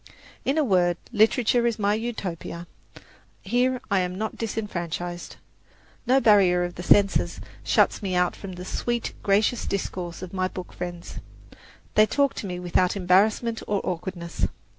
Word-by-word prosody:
In 275 Hz, +3 st, 0 dB
a 310 Hz, -, +4 dB
word, 180 Hz, -7 st, +2 dB, 0.2 s
literature 235 Hz, +2 st, +3 dB
is 235 Hz, -, -1 dB
my 205 Hz, -1 st, +1 dB
Utopia. 195 Hz, -7 st, -4 dB, 0.8 s
Here 250 Hz, +5 st, +1 dB
I 200 Hz, -, +4 dB
am 180 Hz, 0 st, -2 dB
not 220 Hz, +1 st, -3 dB
disfranchised. 175 Hz, -6 st, -4 dB, 0.7 s
No 260 Hz, +2 st, +5 dB
barrier 195 Hz, -7 st, +5 dB
of 175 Hz, 0 st, -3 dB
the 175 Hz, -, -7 dB
senses 200 Hz, +2 st, +3 dB, 0.2 s
shuts -, -, +2 dB
me 190 Hz, -3 st, -2 dB
out 180 Hz, 0 st, +2 dB
from 195 Hz, -2 st, -8 dB
the 180 Hz, 0 st, -8 dB
sweet, 240 Hz, +4 st, -2 dB
gracious 210 Hz, +4 st, +1 dB
discourse 180 Hz, -3 st, -4 dB
of 185 Hz, -, -8 dB
my 185 Hz, -1 st, 0 dB
book 185 Hz, -1 st, -8 dB
friends. 175 Hz, -1 st, -6 dB, 0.7 s
They 215 Hz, 0 st, +5 dB
talk 280 Hz, +2 st, +2 dB
to 200 Hz, -, -4 dB
me 180 Hz, -1 st, -4 dB
without 180 Hz, +1 st, +1 dB
embarrassment 205 Hz, +5 st, +2 dB
or 205 Hz, -1 st, +1 dB
awkwardness. 175 Hz, -1 st, -3 dB
195 Hz, 150 wpm, -25 LUFS, 180-220 Hz, 0.8 s, No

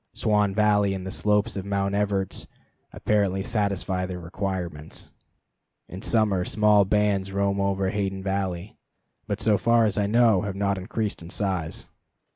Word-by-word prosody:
Swan 105 Hz, -2 st, +1 dB
Valley 105 Hz, -2 st, +3 dB
and 95 Hz, -1 st, -6 dB
the 95 Hz, -, -5 dB
slopes 105 Hz, +3 st, +1 dB
of 95 Hz, -, -3 dB
Mount 100 Hz, 0 st, -1 dB
Everts 100 Hz, -2 st, -1 dB, 0.4 s
apparently 100 Hz, -2 st, 0 dB
satisfy 100 Hz, -4 st, -1 dB
their 90 Hz, -1 st, -5 dB
requirements. 85 Hz, -3 st, -5 dB, 0.8 s
In 95 Hz, -, -8 dB
summer 105 Hz, -5 st, +2 dB
small 105 Hz, 0 st, +3 dB
bands 100 Hz, -1 st, +1 dB
roam 100 Hz, 0 st, 0 dB
over 95 Hz, -1 st, 0 dB
Hayden 95 Hz, -2 st, -2 dB
Valley, 95 Hz, -1 st, -3 dB, 0.5 s
but -, -, -2 dB
so 105 Hz, -3 st, +2 dB
far 115 Hz, -1 st, +4 dB
as 105 Hz, -1 st, 0 dB
I 100 Hz, -, +1 dB
know 115 Hz, -2 st, +4 dB
have 100 Hz, -2 st, -4 dB
not 100 Hz, -1 st, 0 dB
increased 105 Hz, +2 st, -3 dB
in 85 Hz, -, -10 dB
size. 95 Hz, -5 st, -2 dB
100 Hz, 150 wpm, -25 LUFS, 95-105 Hz, 0.8 s, far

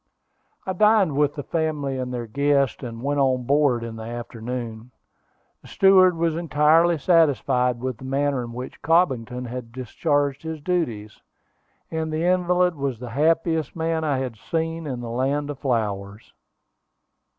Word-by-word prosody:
I 190 Hz, -, -2 dB
dined 210 Hz, -5 st, +3 dB
with 145 Hz, 0 st, +1 dB
the 145 Hz, -, -5 dB
family 150 Hz, -5 st, -2 dB
and 125 Hz, 0 st, -4 dB
their 120 Hz, -1 st, -4 dB
guests, 140 Hz, +3 st, +1 dB
and 115 Hz, -2 st, -7 dB
went 145 Hz, +1 st, 0 dB
on 130 Hz, -2 st, +2 dB
board 135 Hz, -2 st, +2 dB
in 115 Hz, -1 st, -6 dB
the 110 Hz, -, -7 dB
afternoon. 120 Hz, 0 st, -6 dB, 0.7 s
The -, -, -16 dB
steward 185 Hz, -2 st, +5 dB
was 165 Hz, -1 st, 0 dB
entirely 165 Hz, +1 st, +3 dB
satisfied 135 Hz, -7 st, +2 dB
with 130 Hz, -2 st, -4 dB
the 130 Hz, -, -9 dB
manner 135 Hz, -1 st, 0 dB
in 120 Hz, -, -7 dB
which 125 Hz, +2 st, -8 dB
Cobbington 130 Hz, -7 st, +1 dB
had 120 Hz, -1 st, -7 dB
discharged 140 Hz, +3 st, -1 dB
his 160 Hz, -1 st, -5 dB
duties, 125 Hz, -, -3 dB, 0.7 s
and 160 Hz, -1 st, -2 dB
the 155 Hz, +1 st, -1 dB
invalid 180 Hz, 0 st, +2 dB
was 140 Hz, -5 st, -3 dB
the 120 Hz, 0 st, -8 dB
happiest 160 Hz, +2 st, +1 dB
man 160 Hz, -1 st, -1 dB
I 145 Hz, -3 st, 0 dB
had 130 Hz, -4 st, -4 dB
seen 165 Hz, +4 st, -3 dB
in 125 Hz, -3 st, -4 dB
the 115 Hz, -1 st, -6 dB
Land 140 Hz, +4 st, -1 dB
of 140 Hz, -, -9 dB
Flowers. 105 Hz, -5 st, -3 dB
140 Hz, 155 wpm, -23 LUFS, 125-160 Hz, 0.7 s, steward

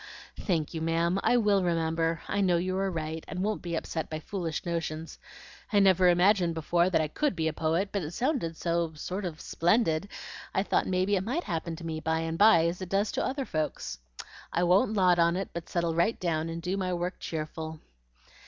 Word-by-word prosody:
"Thank 165 Hz, -5 st, -1 dB
you, 160 Hz, -, -4 dB
ma'am! 165 Hz, +3 st, +1 dB
I 245 Hz, -, +3 dB
WILL 205 Hz, -4 st, +3 dB
remember; 165 Hz, -1 st, 0 dB
I 200 Hz, -, 0 dB
know 180 Hz, -3 st, +3 dB
you 185 Hz, +2 st, -1 dB
are 195 Hz, +1 st, 0 dB
right, 160 Hz, -2 st, -4 dB
and 185 Hz, -, -6 dB
I -, -, -1 dB
won't 215 Hz, +1 st, -1 dB
be 170 Hz, -1 st, -3 dB
upset 160 Hz, 0 st, -3 dB
by 155 Hz, -, -4 dB
foolish 165 Hz, -1 st, -4 dB
notions. 165 Hz, -2 st, -4 dB, 0.5 s
I 210 Hz, -, +3 dB
never 185 Hz, -2 st, +5 dB
imagined 175 Hz, -1 st, +3 dB
before 170 Hz, +3 st, +2 dB
that 185 Hz, -, +2 dB
I 155 Hz, -, +1 dB
COULD 290 Hz, -, -1 dB
be 160 Hz, -1 st, 0 dB
a 160 Hz, -, -1 dB
poet; 165 Hz, +5 st, 0 dB
but 200 Hz, -, -1 dB
it 150 Hz, -, -4 dB
sounded 215 Hz, -, -1 dB
so 170 Hz, -1 st, -1 dB
sort 185 Hz, +6 st, -4 dB
of 165 Hz, -3 st, -5 dB
splendid, 175 Hz, 0 st, +1 dB, 0.5 s
I 190 Hz, -, +2 dB
thought -, -, +1 dB
maybe 190 Hz, +2 st, +1 dB
it -, -, 0 dB
MIGHT 270 Hz, -, -2 dB
happen 165 Hz, 0 st, -3 dB
to 165 Hz, +1 st, -9 dB
me, 160 Hz, -1 st, -3 dB
by 160 Hz, +1 st, 0 dB
and 165 Hz, 0 st, -2 dB
by, 185 Hz, -6 st, +7 dB
as 170 Hz, +2 st, -2 dB
it 185 Hz, -, -5 dB
does 200 Hz, +2 st, +1 dB
to -, -, -1 dB
other 270 Hz, 0 st, -2 dB
folks. 150 Hz, -, -3 dB, 0.5 s
I 175 Hz, -, +1 dB
won't 195 Hz, +6 st, +4 dB
lot 180 Hz, -3 st, +4 dB
on 170 Hz, +1 st, +4 dB
it, 195 Hz, 0 st, -3 dB
but 170 Hz, -1 st, -6 dB
settle 170 Hz, -2 st, 0 dB
right 170 Hz, +8 st, +1 dB
down 165 Hz, -2 st, -1 dB
and 165 Hz, 0 st, -5 dB
do 185 Hz, +2 st, -1 dB
my 185 Hz, -2 st, -1 dB
work 175 Hz, +2 st, -3 dB
cheerful." 160 Hz, 0 st, -5 dB
170 Hz, 220 wpm, -29 LUFS, 160-190 Hz, 0.5 s, by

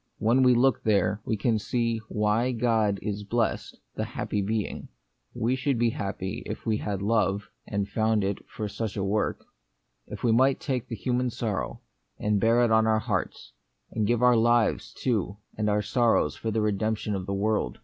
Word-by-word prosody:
When 115 Hz, +4 st, +3 dB
we 125 Hz, -1 st, +5 dB
look 130 Hz, 0 st, +3 dB
there, 105 Hz, -1 st, +1 dB
we 110 Hz, -, -1 dB
can 110 Hz, +1 st, +1 dB
see 115 Hz, +1 st, -1 dB
why 110 Hz, +4 st, +1 dB
God 110 Hz, -4 st, +1 dB
is 105 Hz, -1 st, -2 dB
the 105 Hz, -, -9 dB
blest, 115 Hz, +2 st, -1 dB, 0.2 s
the -, -, -3 dB
happy 105 Hz, -, -3 dB
Being. 105 Hz, +1 st, -3 dB, 0.5 s
We 120 Hz, +4 st, +1 dB
should 130 Hz, 0 st, 0 dB
be 115 Hz, 0 st, +2 dB
happy 95 Hz, -3 st, -4 dB
if -, -, -6 dB
we 110 Hz, -1 st, +1 dB
had 100 Hz, -2 st, -3 dB
love, 105 Hz, -1 st, +1 dB, 0.2 s
and 100 Hz, -2 st, -2 dB
found 110 Hz, -1 st, +1 dB, 0.2 s
for 110 Hz, -, -5 dB
it -, -, -3 dB
such 110 Hz, -1 st, -4 dB
a 100 Hz, -, -1 dB
work; 105 Hz, +2 st, -1 dB, 0.6 s
if -, -, -8 dB
we 120 Hz, -, +3 dB
might 130 Hz, +4 st, +4 dB
take 130 Hz, -3 st, -2 dB
the 115 Hz, -, -4 dB
human 125 Hz, +3 st, 0 dB
sorrow, 100 Hz, -, -3 dB, 0.4 s
and 105 Hz, -1 st, +1 dB
bear 115 Hz, +2 st, +4 dB
it 115 Hz, -, 0 dB
on 110 Hz, 0 st, +4 dB
our 110 Hz, 0 st, +3 dB
hearts, 110 Hz, -, -3 dB, 0.4 s
and 110 Hz, -2 st, 0 dB
give 120 Hz, +1 st, +1 dB
our 125 Hz, -1 st, +6 dB
lives, 120 Hz, 0 st, +2 dB
The -, -, -22 dB
Mystery 130 Hz, -, -1 dB
of -, -, +4 dB
Pain. 95 Hz, -, -1 dB
19 100 Hz, -, -10 dB
too, 105 Hz, -, -31 dB, 0.2 s
and 105 Hz, 0 st, +1 dB
our 105 Hz, 0 st, +2 dB
sorrows 120 Hz, +2 st, +2 dB
for 115 Hz, -, -4 dB
the 110 Hz, 0 st, 0 dB
redemption 105 Hz, +1 st, -1 dB
of 95 Hz, -2 st, -4 dB
the 100 Hz, -, -1 dB
world. 105 Hz, -, 0 dB
110 Hz, 210 wpm, -27 LUFS, 105-120 Hz, 0.6 s, our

